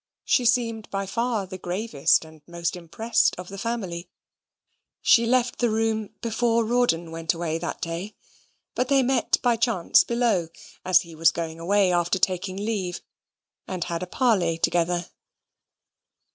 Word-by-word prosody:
She 250 - +2
seemed 230 -2 +1
by 195 0 -2
far 230 +1 -1
the 185 0 -9
gravest 180 -5 +1
and 160 -1 -16
most 170 0 -3
impressed 180 +7 0
of 180 0 -8
the 195 - -8
family. 190 -7 -4 0.9
She 230 0 +5
left 250 0 +1
the 240 - +2
room 220 -1 -1
before 230 0 +1
Rawdon 220 -9 +1
went 165 +1 -2
away 165 -1 -2
that 170 - -5
day; 170 +5 -5 0.6
but 250 - 0
they 275 -1 +4
met 255 -1 +1
by 240 -2 +3
chance 225 -7 +3
below, 235 -8 +1 0.4
as 185 -1 +5
he 170 -1 -12
was 165 +1 +4
going 165 -1 -5
away 195 +2 +2
after 175 +1 +1
taking 185 0 -1
leave, 200 -4 -3 0.7
and 185 -2 -3
had 170 -1 -4
a 185 - -4
parley 185 -8 +1
together. 175 +1 +1
190 Hz, 150 wpm, -25 LUFS, 170-230 Hz, 0.9 s, She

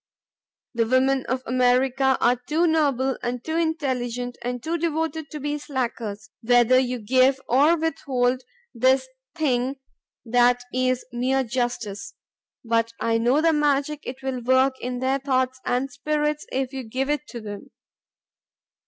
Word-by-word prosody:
The 230 -1 +1
women 260 +2 +2
of 260 0 -2
America 255 +2 +2
arc 245 +1 +1
too 325 +3 +2
noble 280 -5 +1
and 245 0 -3
too 320 - -2
intelligent 250 -7 -2
and 245 0 -4
too 330 +1 -1
devoted 320 -2 -2
to 300 - -7
be 295 +1 -2
slackers 230 -6 -4
whether 245 +2 +5
you 250 -1 -1
give 255 +4 +3
or 290 +7 +4
withhold 260 -5 0 0.3
this 260 +2 +3 0.3
thing 265 -4 0 0.5
that 245 +1 +3
is 255 0 0
mere 260 +2 +1
justice; 235 -4 -3 0.5
but 230 0 +1
I 230 0 +1
know 245 +6 +3
the 325 0 +3
magic 295 0 +1
it 260 +1 -8
will 260 -2 -3
work 260 +2 +3
in 250 0 -4
their 265 +1 +1
thoughts 260 -1 0
and 260 +3 0
spirits 300 +1 -1
if 265 0 -2
you 265 - -4
give 260 +4 -2
it 295 0 -3
them. 215 -4 -8
260 Hz, 145 wpm, -24 LUFS, 245-280 Hz, 0.5 s, whether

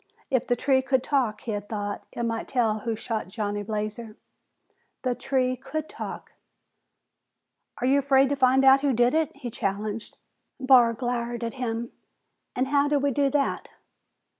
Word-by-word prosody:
If 260 -3 +1
the 245 - +2
tree 260 +2 +2
could 260 -1 +1
talk, 250 -7 0
he 235 - -4
had 205 -1 -4
thought, 205 -2 -4
it 235 - -4
might 230 -1 -2
tell 225 -4 +1
who 225 +1 -2
shot 220 -3 -4
Johnny 205 0 -3
Blazer. 215 +1 -5 0.9
The 255 -1 +1
tree 255 +1 0
could 310 +4 -5
talk! - - -7 1.5
"Are 245 - -2
you 275 +2 +4
afraid 270 -1 +4
to 285 - +1
find 265 0 +4
out 270 0 +7
who 280 -2 +2
did 240 +2 +3
it?" 315 -1 +2
he 255 -4 -7
challenged. 210 +2 -4 0.4
Barr 255 -3 +5
glowered 240 0 -3
at 230 - -3
him. 235 -2 -3 0.6
"An' 255 - +1
how 280 +1 +2
do 290 0 +2
we 280 0 +1
do 280 +1 +2
that!" 280 0 -1
245 Hz, 165 wpm, -26 LUFS, 225-270 Hz, 1.5 s, out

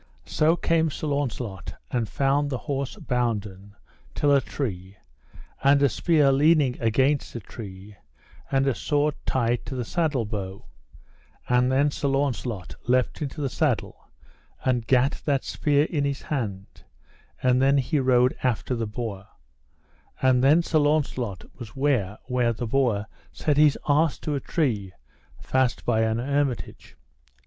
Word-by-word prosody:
So 155 +2 +2
came 165 -2 +1
Sir 155 - -5
Launcelot 125 - -3 0.2
and 115 -4 -1
found 140 +3 +1
the 130 - -2
horse 140 -1 -4
bounden 105 -5 -3 0.4
till 145 -1 +3
a 140 - +5
tree, 95 -8 -5 0.7
and 140 +1 +5
a 140 - +5
spear 150 -1 +3
leaning 145 -2 +3
against 130 +6 +1
a - - -3
tree, 100 -1 -10 0.5
and 135 0 +2
a 135 - +2
sword 145 +4 0
tied 120 -2 0
to 135 - -5
the 125 -2 -3
saddle 150 -5 0
bow; 100 -3 -6 0.8
and 125 +1 +3
then 140 +2 +3
Sir 140 - -2
Launcelot 130 -8 -2
leapt 125 +4 +1
into 150 +1 -4
the 140 - 0
saddle - - -2 0.6
and 125 -3 0
gat 130 +2 +2
that 140 -3 +1
spear 145 -1 +1
in 150 -2 -1
his 140 -1 -2
hand, 100 -9 -5 0.6
and 125 0 +3
then 135 +1 +4
he 140 +3 +1
rode 125 -1 +3
after 125 0 -1
the 115 -2 -2
boar; 105 -3 -5 0.9
and 130 -1 +3
then 155 +5 +5
Sir 160 -2 +1
Launcelot 145 -9 0 0.2
was 115 -4 -9
ware 125 -8 0
where 125 -2 +1
the 115 +2 -4
boar 115 -4 +1 0.3
set 150 -2 -1
his 150 -1 +5
arse 150 +1 +2
to 150 - -4
a 140 - 0
tree 110 - -1 0.5
fast 130 -2 0
by 110 -2 +2
an 110 0 +1
hermitage. 135 -3 -2
130 Hz, 150 wpm, -25 LUFS, 115-145 Hz, 0.9 s, a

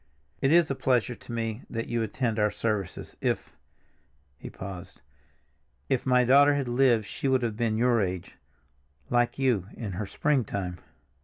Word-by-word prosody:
"It 135 - +3
is 170 -3 +5
a - - +2
pleasure 125 -2 +1
to 120 - -12
me 115 0 -3
that 115 -1 -4
you 120 -1 -1
attend 115 +1 -1
our 105 0 +3
services. 105 -2 -3
If—" - - -1 0.9
he - - -8
paused, 95 -2 -9 0.9
"if 130 0 0
my 125 -1 +5
daughter 140 +3 +6
had 140 -3 -1
lived 120 -3 +3
she 135 - -4
would 130 -2 +2
have 115 -3 -1
been 110 -1 0
your 120 -1 +3
age—like 70 - -4
you, 125 -9 +1
in 110 -5 -4
her 95 +3 -4
springtime." 100 - -1
115 Hz, 155 wpm, -27 LUFS, 100-125 Hz, 0.9 s, daughter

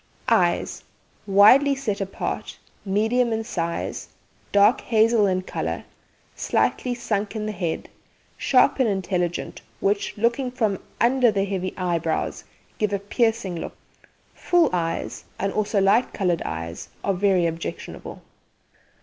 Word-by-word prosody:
EYES - - +1 0.4
Widely 235 +9 +6
set 220 -7 -3
apart, 195 0 -4 0.3
medium 225 +5 +1
in 225 0 -1
size, 170 -6 -3 0.4
dark 205 +4 +5
hazel 225 -2 +3
in 185 -1 0
colour, - - -3 0.5
slightly 250 -1 0
sunk 215 -3 -2
in 215 -1 -3
the 215 - -2
head, 175 -5 -3 0.5
sharp 260 +1 +3
and 250 -4 +3
intelligent, 180 -3 -2 0.2
which, 200 +1 0
looking 235 +4 +1
from 220 -6 -1 0.2
under 250 0 +4
the 200 -2 0
heavy 185 -2 -2
eyebrows, 170 -3 -1 0.4
give 210 -1 +1
a 200 - +1
piercing 200 -3 0
look. - - -7 0.6
Full 350 -3 +2
eyes, 165 -2 -2
and 195 0 -2
also 210 -1 +1
light 195 +6 +3
coloured 180 -5 0
eyes, 80 +1 -5
are 195 - +1
very 185 -2 +2
objectionable. 165 0 -5
200 Hz, 125 wpm, -24 LUFS, 185-230 Hz, 0.6 s, Widely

